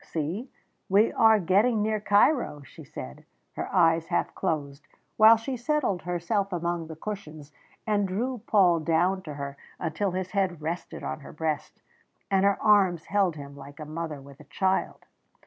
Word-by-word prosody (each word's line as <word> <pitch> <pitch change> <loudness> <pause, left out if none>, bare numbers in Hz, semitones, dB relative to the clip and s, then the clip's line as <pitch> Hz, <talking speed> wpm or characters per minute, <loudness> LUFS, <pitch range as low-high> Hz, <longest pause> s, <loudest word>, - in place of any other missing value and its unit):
"See, 170 - -4 0.4
we 205 +4 +4
are 220 -1 +5
getting 205 +5 +2
near 215 0 0
Cairo," 205 - +2
she - - -13
said, 65 0 -9 0.3
her - - -4
eyes 165 -2 +3
half - - -1
closed, 145 -5 -3 0.3
while 220 +1 +8
she 255 +4 -4
settled 245 - -1
herself 180 +4 -1
among 170 -1 -2
the 160 - -8
cushions, 155 -6 -7 0.3
and 205 -2 +1
drew 235 +5 -3
Paul 180 -5 +4
down 170 +4 +1
to 150 -5 -8
her 140 0 -6 0.2
until 175 +4 -2
his 185 0 -4
head 190 -4 0
rested 165 +3 -5
on 70 0 -4
her - - -11
breast, 155 -1 -4 0.5
and 195 0 +3
her 200 0 +3
arms 190 -6 +3
held 195 -5 +1
him 140 -1 -9
like 140 +1 -12
a 155 - -6
mother 155 -1 -5
with 140 0 -14
a 150 - -14
child. 190 +3 -1
180 Hz, 165 wpm, -27 LUFS, 155-205 Hz, 0.5 s, while